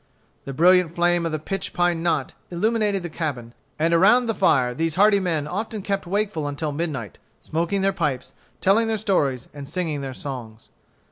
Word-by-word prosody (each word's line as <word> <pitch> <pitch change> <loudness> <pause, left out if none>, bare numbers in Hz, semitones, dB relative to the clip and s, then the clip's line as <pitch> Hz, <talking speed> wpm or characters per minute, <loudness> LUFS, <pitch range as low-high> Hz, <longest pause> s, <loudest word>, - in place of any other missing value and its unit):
The 140 - -5
brilliant 175 +2 +4
flame 175 -1 +2
of - - -4
the 155 - -1
pitch 195 +6 -4
pine 175 -2 +1
knot 170 0 0 0.2
illumined 205 +1 0
the - - -3
cabin; 140 -8 -4 0.2
and 165 +2 +1
around 210 +9 +5
the 225 - 0
fire 125 -10 +2
these 160 +3 -1
hardy 200 +2 +5
men 165 -6 -1
often 210 +4 -4
kept 195 -2 -2
wakeful 195 -5 -1
until 145 +1 -3
midnight, 145 - -4 0.2
smoking 170 +5 -1
their 195 0 +2
pipes, 145 -6 -2 0.3
telling 215 +4 +3
their 220 -1 0
stories, 145 - 0
and 145 -1 -8
singing 160 -6 -2
their 135 -1 -5
songs. 115 -6 -8
170 Hz, 180 wpm, -23 LUFS, 145-195 Hz, 0.3 s, around